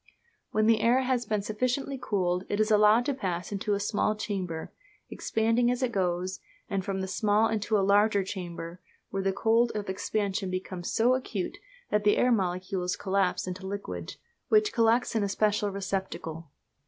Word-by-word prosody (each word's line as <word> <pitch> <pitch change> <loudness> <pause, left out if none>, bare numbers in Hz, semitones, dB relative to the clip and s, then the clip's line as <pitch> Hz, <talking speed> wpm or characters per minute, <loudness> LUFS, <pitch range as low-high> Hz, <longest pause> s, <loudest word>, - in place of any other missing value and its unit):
When 215 0 +1
the 225 -1 +4
air 240 +3 +4
has 250 -3 0
been 210 -1 0
sufficiently 255 +6 -1
cooled 180 -4 0
it 205 - -1
is 215 0 +2
allowed 210 +3 +5
to 285 - 0
pass 185 -8 -3
into 205 +1 -1
a - - -2
small 210 +1 0
chamber, 185 -6 -4 0.4
expanding 230 +2 +1
as 250 +1 0
it 250 - +1
goes, 185 -1 -1 0.3
and 195 -1 -2
from 190 -1 -2
the 190 - -3
small 210 +2 +2
into 215 -1 0
a 195 - +2
larger 205 0 +4
chamber, 175 -2 -6 0.3
where 195 - -1
the 195 0 +1
cold 230 +4 +2
of 205 -2 -3
expansion 195 0 -1
becomes 185 -1 -4
so 240 +3 +3
acute 255 - -3 0.3
that 210 0 +2
the 205 0 +4
air 250 - +3
molecules 185 -2 0
collapse 195 -1 0
into 185 +1 -6
liquid, 200 +1 -5 0.3
which 425 -1 +3
collects 230 +1 +3
in 220 - +2
a 200 - 0
special 210 0 +1
receptacle. 190 -5 -4
205 Hz, 175 wpm, -28 LUFS, 190-225 Hz, 0.4 s, allowed